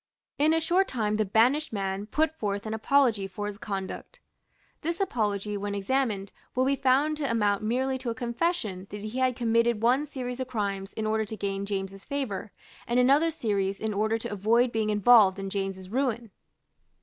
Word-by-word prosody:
In 300 +2 +4
a 325 - +3
short 360 +4 +2
time 215 -4 -1
the 215 - +1
banished 245 +10 +3
man 195 -1 -3
put 315 +6 +1
forth 205 -6 -3
an 215 - -3
apology 220 -3 +2
for 205 +2 -6
his 205 -1 -5
conduct. 195 -3 -6 0.6
This 335 +2 -2
apology, 210 - -1
when 200 0 -3
examined, 200 -2 -1 0.2
will 255 +1 +2
be 275 +1 +2
found 275 +4 +2
to 285 -3 -2
amount 210 -3 +1
merely 260 +4 0
to 250 - -4
a 230 - -2
confession 235 - -2
that 205 0 -7
he 215 +5 -4
had 255 -1 +2
committed 230 -1 +1
one 260 +5 +3
series 250 -3 -5
of 260 - -3
crimes 200 -5 -3
in 220 - -3
order 220 0 +1
to 220 +1 -7
gain 200 0 -3
James's 195 -1 -4
favour, 255 -8 -4 0.4
and 240 +1 +2
another 280 +6 +4
series 200 -9 -1
in 220 -1 -2
order 215 +2 +1
to 220 - -5
avoid 230 +5 +2
being 220 -2 0
involved 210 -2 +6
in 195 0 -5
James's 195 -1 -3
ruin. 235 -1 -1
220 Hz, 185 wpm, -27 LUFS, 200-260 Hz, 0.6 s, involved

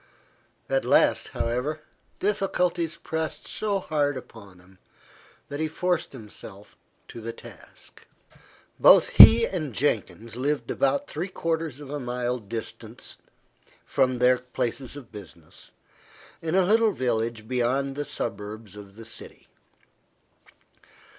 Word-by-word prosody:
At - - +1
last, - - +3
however, 130 +7 -2 0.4
difficulties 180 -4 0
pressed 160 -1 -4
so 210 -2 +1
hard 145 -6 0
upon 100 -7 -12
him, 90 +1 -21 0.7
that 145 - -6
he 160 - 0
forced 175 +1 -1
himself 105 -4 -12 0.3
to 115 - -9
the 115 +1 -4
task. - - -14 0.7
Both - - +7
he 110 +3 +10
and 155 - -4
Jenkins 115 -4 -1
lived 145 +4 -1
about 280 +1 +1
three 170 +5 -4
quarters 165 -5 -2
of 145 -2 -9
a 145 - -3
mile 125 -1 -2
distant 110 +1 -6 0.7
from 130 -2 +1
their 125 +1 +4
places 125 +1 -3
of 140 -5 -11
business, 85 -7 -12 0.7
in 165 +1 -1
a 190 -1 +4
little 220 +2 +4
village 115 -3 -2
beyond 130 +3 0
the 145 - -2
suburbs 105 -4 -6
of 100 -1 -12
the 115 +1 -11
city. 110 - -9
130 Hz, 120 wpm, -26 LUFS, 110-160 Hz, 0.7 s, he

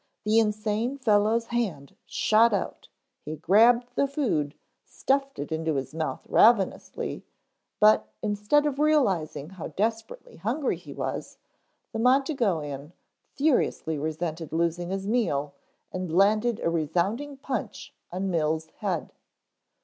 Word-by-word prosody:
The 215 +1 +4
insane 215 +4 0
fellow's 220 -1 +2
hand 200 - -3
shot 225 +1 +3
out, 195 - -4 0.4
he 155 - -5
grabbed 230 - +4
the 280 - +1
food, 225 - -1 0.3
stuffed 275 0 -1
it 145 - -5
into 160 -1 -1
his 135 +2 -3
mouth 160 0 -3
ravenously, 220 -4 +2 0.6
but 215 0 +5
instead 210 +8 +2
of 285 -2 -1
realizing 195 - +1
how 185 -3 -7
desperately 225 - -3
hungry 260 +7 -1
he - - -12
was, - - -5 0.6
the 225 - -3
Montegoean 205 - +1 0.4
furiously 260 - +1
resented 160 +1 -4
losing 170 +2 -1
his 195 0 -3
meal 150 - 0 0.4
and 185 -2 -4
landed 210 +6 +3
a - - +1
resounding 180 - -1
punch 265 -5 -5 0.2
on 190 +2 -2
Mills' 160 -1 0
head. 185 -6 -3
205 Hz, 120 wpm, -27 LUFS, 160-240 Hz, 0.6 s, but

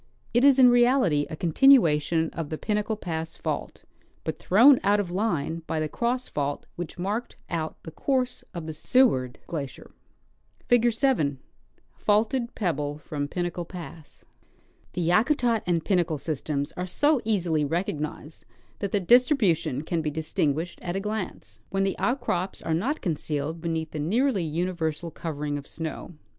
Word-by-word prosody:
It 240 +2 +3
is 275 -1 +7
in 255 -2 +8
reality 240 - +3
a - - -5
continuation 165 - +4
of 160 -3 -5
the 155 - -3
Pinnacle 210 +3 -1
pass 165 -5 -5
fault, - - -4 0.4
but - - -4
thrown 245 +8 +6
out 205 +1 +3
of 185 -4 -2
line 170 -5 -1
by 160 - -1
the 155 - 0
cross 245 +8 -1
fault 145 -1 -3
which 175 0 -6
marked 205 +7 -3
out 160 -2 -2
the 160 - -8
course 255 - 0
of 170 -4 -6
the 160 - -5
Seward 155 - +2
glacier. 145 -5 -6 0.8
Figure 240 0 +4
7 225 - +1 0.3
— - - -39
Faulted 235 +4 +1
Pebble 150 -7 -1
from 145 -1 -4
Pinnacle 175 +2 -3
Pass. 170 -3 -11 0.7
The 175 -2 -1
Yakutat 230 - +3
and 170 -3 +1
Pinnacle 175 -5 +1
systems 145 -1 -2
are 180 +1 -5
so 290 - +2
easily 180 -8 +1
recognized 155 -1 -3 0.4
that 200 -2 -3
their 205 - +2
distribution 180 - +3
can 165 +1 -1
be 155 - -1
distinguished 155 +1 -2
at 175 0 -4
a - - 0
glance, 195 - -5
when 195 0 0
the 195 -1 0
outcrops 195 -8 -1
are 160 - -1
not 255 - -1
concealed 155 -1 -3
beneath 160 -1 -2
the 155 - -5
nearly 210 - +1
universal 165 0 -2
covering 150 -3 -4
of 140 - -12
snow. 165 +1 -6
175 Hz, 155 wpm, -26 LUFS, 155-220 Hz, 0.8 s, in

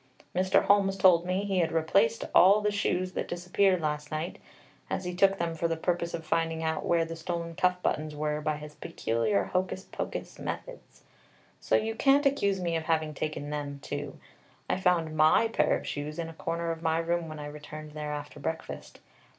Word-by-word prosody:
Mr. 185 +1 +3
Holmes 195 -1 +3
told 175 -2 +5
me 185 +2 0
he 195 -2 0
had 165 -1 +1
replaced 195 +8 +2
all 195 +3 +7
the 210 0 +1
shoes 185 -2 0
that - - -3
disappeared 180 +1 +1
last 150 -1 -2
night, 155 +3 -4 0.5
as - - -2
he 180 - -3
took 195 +2 +4
them 170 -2 -1
for 165 +1 -1
the 165 -1 -1
purpose 170 0 -1
of 165 -1 -7
finding 165 0 0
out 160 0 -1
where 170 -1 +2
the 165 0 -6
stolen 170 0 -4
cuff 180 +2 +2
buttons 155 0 -1
were 150 0 -1
by 155 0 -1
his 150 0 -9
peculiar 115 - 0
hocus 185 +1 -2
pocus - - -6
methods, - - -7 0.6
so - - +1
you 225 +1 +1
can't 275 +5 +4
accuse 200 -9 +2
me 170 -2 -1
of 160 -1 -2
having 155 -2 0
taken 150 0 -4
them 145 -1 -4
too. 145 -1 -5 0.5
I - - 0
found 170 -4 +2
my 155 +8 +5
pair 150 -9 +2
of - - -9
shoes 150 +2 -4
in 165 -1 -3
a - - -9
corner 170 +1 -2
of 165 0 -5
my 160 -1 +1
room 165 0 -1
when 155 - -7
I 150 - -6
returned 150 +1 -8
there 150 0 -5
after 145 0 -6
breakfast. 160 +3 -5
165 Hz, 200 wpm, -29 LUFS, 155-185 Hz, 0.6 s, all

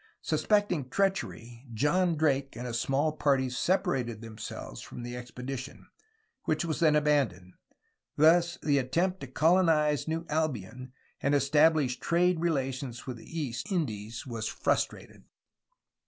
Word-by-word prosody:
Suspecting 195 -10 +1
treachery 130 -11 -2
John 170 +7 +2
Drake 140 -3 +1
and 125 - -6
a 120 - -4
small 135 +6 +1
party 135 -4 +1
separated 135 - 0
themselves 110 - -8
from 120 - -9
the 120 0 -5
ex 125 0 -8
pedition, 130 +2 -6 0.6
which 155 +2 0
was 160 -2 -2
then 155 -3 +4
abandoned. 135 -13 +1 0.6
Thus 170 +3 +4
the 145 -2 +3
attempt 175 +9 0
to 140 - -7
col 160 +8 +3
onise 150 -5 +2
New 165 +1 -2
Albion 130 -5 -3 0.3
and 140 +1 +2
establish 145 -1 +3
trade 175 0 +2
relations 135 -6 -2
with 130 -3 -5
the 165 +8 -7
East 140 - -4
Indies 115 - -3
was 115 -3 -4
frustrated. - - -2
140 Hz, 135 wpm, -29 LUFS, 125-165 Hz, 0.6 s, then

